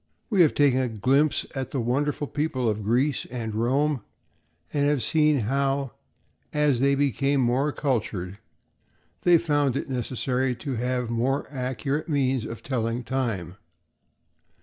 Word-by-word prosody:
We 195 -4 +4
have 155 - +4
taken 140 -3 +4
a 125 - -1
glimpse 135 +7 +2
at 130 -2 -3
the 135 - -2
wonderful 140 +5 0
people 145 -4 -1
of 110 -1 0
Greece 125 +6 +1
and 115 -3 -4
Rome, 135 +5 +1 0.7
and 145 -1 +2
have 145 -4 +1
seen 150 -4 +3
how, 135 +3 0 0.6
as 150 -4 +2
they 140 +1 +3
became 140 0 +1
more 130 +4 +2
cultured, 105 - -2 0.8
they 175 -1 +6
found 145 -5 +1
it - - -4
necessary 125 +1 -1
to 135 +3 -5
have 125 0 -1
more 130 +4 0
accurate 135 +3 -2
means 135 -5 +1
of 115 0 -7
telling 120 -2 -2
time. 115 -8 -2
130 Hz, 140 wpm, -25 LUFS, 120-145 Hz, 0.8 s, they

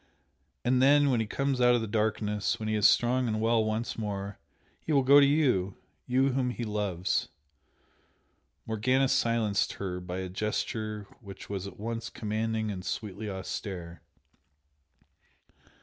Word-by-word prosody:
And 125 +1 +3
then 145 +1 +5
when 120 - +2
he 110 - -1
comes 135 +2 -1
out 125 0 +6
of 120 - +1
the - - -2
darkness 105 -2 -1
when 110 - -4
he 110 - 0
is 105 -1 +5
strong 125 +1 +2
and 110 -1 -1
well 115 0 +2
once 110 +2 -2
more, 100 -2 -4 0.4
he - - -3
will 140 -3 +4
go 140 +2 +7
to 140 - +7
YOU! 125 -11 +1 0.3
you 130 +2 +3
whom 130 -1 0
he 120 -1 -4
loves 105 -5 -1 0.7
" - - -41
Morgana 130 +5 +2
silenced 115 -6 +1
her 90 -2 -4
by 90 0 -6
a 95 0 -3
gesture 105 +1 -3
which 100 -3 -10
was 100 -1 -3
at 100 - -11
once 115 +2 -4
commanding 110 0 -2
and 90 -2 -6
sweetly 105 +1 -4
austere. 95 -3 -6
110 Hz, 155 wpm, -29 LUFS, 100-125 Hz, 0.7 s, go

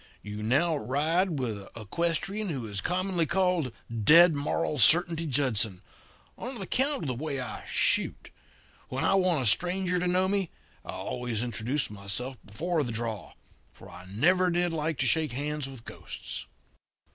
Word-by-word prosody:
'You 105 0 -6
now 145 +10 +2
ride 155 +6 +1
with 115 -6 -2
a 100 +3 -11
equestrian 170 - -2
who 135 -8 -3
is 100 -2 -2
commonly 180 - 0
called 180 -6 +1 0.3
Dead 165 - +8
Moral 150 +1 -1
Certainty 165 +6 +5
Judson, 120 -9 0 0.6
on 245 0 -2
account 265 - 0
of - - -3
the 130 - -1
way 140 +2 -4
I 125 -4 -6
shoot. - - +1 0.6
When 130 +1 -2
I - - +3
want 180 -7 +3
a - - -2
stranger 180 - +3
to 180 - -1
know 185 +1 +2
me 195 -3 0 0.3
I - - -15
always 120 -2 -3
introduce 120 +3 -2
myself 105 +6 -3
before 160 - -2
the 120 - -4
draw, 110 -3 -4 0.4
for 95 - -14
I 90 +1 -11
never 180 - +3
did 175 0 0
like 160 -1 -1
to - - +2
shake 150 +2 +2
hands 145 +1 -3
with 130 -4 -11
ghosts.' - - -8
150 Hz, 160 wpm, -28 LUFS, 120-175 Hz, 0.6 s, Dead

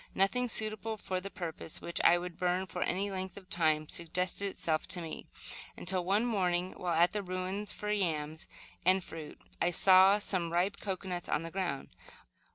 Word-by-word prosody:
Nothing 245 +6 +2
suitable 220 0 0
for 185 -2 -3
the 195 - -6
purpose, 165 -4 -6
which 170 - -2
would 175 0 +3
burn 180 +1 +1
for 180 -1 -6
any 200 +3 0
length 190 0 -4
of 190 -2 -12
time, 155 -3 +2
suggested 180 +4 -1
itself 160 -5 -1
to 185 -1 0
me, 165 -2 -6 0.5
until, 180 0 +3
one 200 +6 +2
morning, 185 -5 +1
while 175 -2 -1
at 170 +2 +5
the 210 - -1
ruins 185 +2 -3
for 210 0 -3
yams 160 -6 -1 0.4
and 185 +1 +4
fruit, 160 -3 -9 0.2
I 175 - +4
saw 190 +2 +7
some 185 -5 -1
ripe 180 +4 +1
cocoanuts 185 -3 -4
on 155 - +1
the 165 - -6
ground. 175 -8 -2
185 Hz, 170 wpm, -32 LUFS, 170-195 Hz, 0.5 s, saw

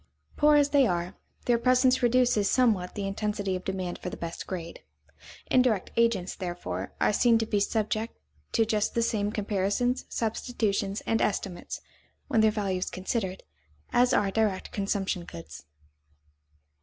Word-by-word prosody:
Poor 300 0 +5
as 290 -1 +4
they 280 -3 +4
are, 175 +1 -2 0.3
their 240 -1 +3
presence 255 +1 +3
reduces 240 -4 +3
somewhat 215 -8 +2
the 205 -2 -3
intensity 200 -1 -2
of 185 - -5
demand 185 -2 -3
for - - -4
the - - -7
best 170 0 -6
grade. 170 -3 -6 0.7
Indirect 250 -7 +3
agents, 230 -6 +2
therefore, 175 -1 -5
are - - +3
seen 235 +1 +4
to 225 - 0
be 210 -2 0
subject 215 +2 -1 0.4
to 225 - +3
just 215 -2 0
the 235 - +2
same 210 -2 0
comparisons, 210 +5 0
substitutions, 215 -3 -1
and 225 - 0
estimates, 195 -3 -2 0.5
when 230 -6 +3
their 220 - +5
value 200 -4 -1
is - - -2
considered, 190 0 -3 0.5
as 245 +1 +4
are 200 -1 +2
direct 210 -3 0
consumption 195 -3 -1
goods. 75 - -10
210 Hz, 150 wpm, -28 LUFS, 190-235 Hz, 0.7 s, Poor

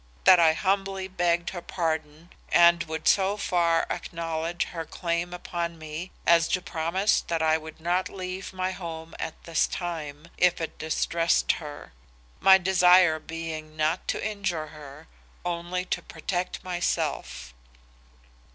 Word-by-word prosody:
That 185 - +8
I 160 -2 +6
humbly 195 +1 -1
begged 175 -2 0
her 175 - -6
pardon 160 -1 -3 0.2
and 170 0 +6
would 160 -1 -4
so 195 +1 +3
far 170 -4 +2
acknowledge 165 0 -3
her 165 -2 -5
claim 170 +1 -2
upon 170 -1 -4
me 155 +3 -6 0.2
as 170 0 +5
to 185 - +1
promise 185 +2 +1
that 165 -1 0
I 160 0 +3
would 160 0 -11
not 175 +2 0
leave 185 0 -6
my 185 0 -2
home 165 -3 -7
at 160 - -6
this 165 -2 +1
time, 160 -3 -5
if 180 -1 +4
it 160 - -5
distressed 165 +1 +1
her; 150 - -8 0.5
my 190 0 +8
desire 180 -3 +5
being 160 -1 -7
not 155 +3 0
to - - -1
injure 190 -7 -3
her, 145 -3 -12 0.4
only 175 +1 -2
to - - -3
protect 175 +3 -4
myself. 175 - -2
170 Hz, 140 wpm, -27 LUFS, 160-180 Hz, 0.5 s, That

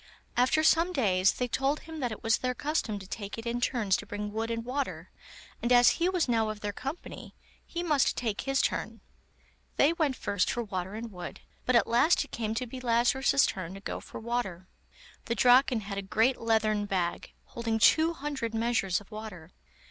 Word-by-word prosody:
After 255 +5 +3
some 335 +3 +4
days 190 - +3
they 250 - -2
told 270 +5 0
him 320 -1 -9
that 245 -4 -1
it 215 - -8
was 225 0 +3
their 250 0 -1
custom 285 -8 -1
to 195 - -9
take 200 +1 -6
it 225 - -7
in 235 +1 -2
turns 225 -7 +1
to - - -8
bring 205 0 -5
wood 225 +1 -2
and 230 0 -3
water, 270 +3 -4 0.5
and 240 - -1
as 245 0 +7
he 350 - +3
was 360 -5 +1
now 225 -3 +1
of 215 -1 -6
their 205 -1 -3
company, 275 - -7 0.3
he 345 0 -4
must 300 -6 +2
take 220 -4 -2
his 270 0 +1
turn. - - -2 0.7
They 295 +4 +4
went 310 -6 0
first 200 -5 0
for 240 - -1
water 190 -1 -4
and 225 +1 -6
wood, 180 -2 -8 0.3
but 255 - +3
at 230 - +5
last 245 +9 +3
it - - -21
came 220 -1 -3
to 250 +2 -1
be 255 +2 -8
Lazarus's 250 +3 +3
turn 185 -1 -4
to - - -8
go 195 - -5
for - - -9
water. 220 -6 -3 0.6
The 235 - -1
Draken 250 +1 +5
had 200 -1 -5
a - - -2
great 225 +6 +1
leathern 215 -2 +1
bag, 180 -3 -2
holding 230 -1 -3
two 315 +9 +5
hundred 275 -7 -4
measures 225 -5 +1
of 205 - -18
water. 205 -6 -8
230 Hz, 200 wpm, -29 LUFS, 205-260 Hz, 0.7 s, as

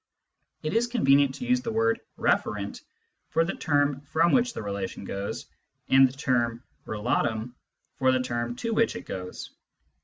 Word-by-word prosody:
It 155 - -2
is 230 +2 +2
convenient 140 - +3
to 245 - -6
use 250 0 +2
the 235 - -3
word 225 +1 +1 0.2
referent - - 0 0.5
for 165 0 +2
the 185 - -2
term 145 -2 +1
from 160 +4 +2
which 245 -1 +3
the - - -5
relation 100 -1 -4
goes, 100 +4 -4 0.4
and 135 0 +7
the - - -11
term 120 -3 0 0.2
relatum 110 +1 -1 0.5
for 130 -1 +4
the 130 0 +1
term 120 -1 -2
to 230 - -2
which 230 +1 +2
it - - -7
goes. 90 -1 -6
135 Hz, 160 wpm, -27 LUFS, -, 0.5 s, and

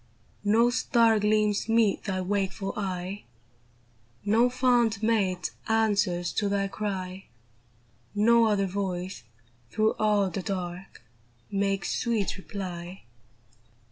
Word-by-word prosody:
No 225 +4 +4
star 230 -3 +3
gleams 210 0 +1
meet 225 -3 +2
thy 190 -2 -1
wakeful 195 +1 -2
eye; 190 0 -4 1.0
No 225 +4 +4
fond 245 -4 +2
mate 195 -5 +1 0.2
answers 205 -6 +1
to 205 -2 0
thy 200 0 0
cry; 195 -2 -4 0.9
No 230 +2 +5
other 205 -3 +2
voice, 190 -1 -3 0.5
through 215 0 +1
all 205 -3 +2
the 190 - -3
dark, 180 -4 -5 0.5
Makes 195 -1 0
sweet 230 -5 0
reply. 185 -2 -7
200 Hz, 105 wpm, -27 LUFS, 190-220 Hz, 1.0 s, No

